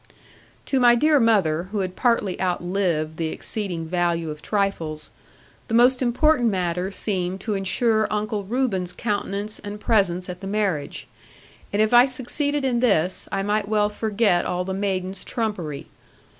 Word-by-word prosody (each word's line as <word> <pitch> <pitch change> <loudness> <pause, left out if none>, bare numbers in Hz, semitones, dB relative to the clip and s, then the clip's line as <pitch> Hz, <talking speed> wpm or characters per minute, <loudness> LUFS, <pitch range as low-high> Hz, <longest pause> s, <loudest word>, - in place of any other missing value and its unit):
To 270 - +1
my 240 -1 +6
dear 300 +4 +4
mother, 185 -7 +2
who 210 -2 -1
had 185 -1 -4
partly 230 -7 +1
outlived 175 -3 -1
the 165 - -1
exceeding 175 -1 -4
value 170 -1 -1
of 150 - -9
trifles, 165 -7 -2 0.6
the 225 - -1
most 250 +2 +5
important 250 +1 +3
matter 180 -1 -1
seemed 190 -2 -3
to 215 - -2
ensure 215 +3 +1
Uncle 210 0 -2
Reuben's 195 -5 -1
countenance 205 -1 -3
and 205 0 -7
presence 190 -5 +1
at 180 +1 -7
the 195 - -6
marriage. 195 -8 -2 0.6
And 205 +1 +3
if 215 - 0
I 240 +2 +8
succeeded 280 +3 -2
in 245 -2 +1
this, 190 -7 +1
I 195 0 -1
might 205 0 0
well 210 -1 +2
forget 210 -4 +1
all 180 0 -2
the 190 - -3
maidens' 190 -1 -2
trumpery. 185 - -3
200 Hz, 155 wpm, -23 LUFS, 180-225 Hz, 0.6 s, I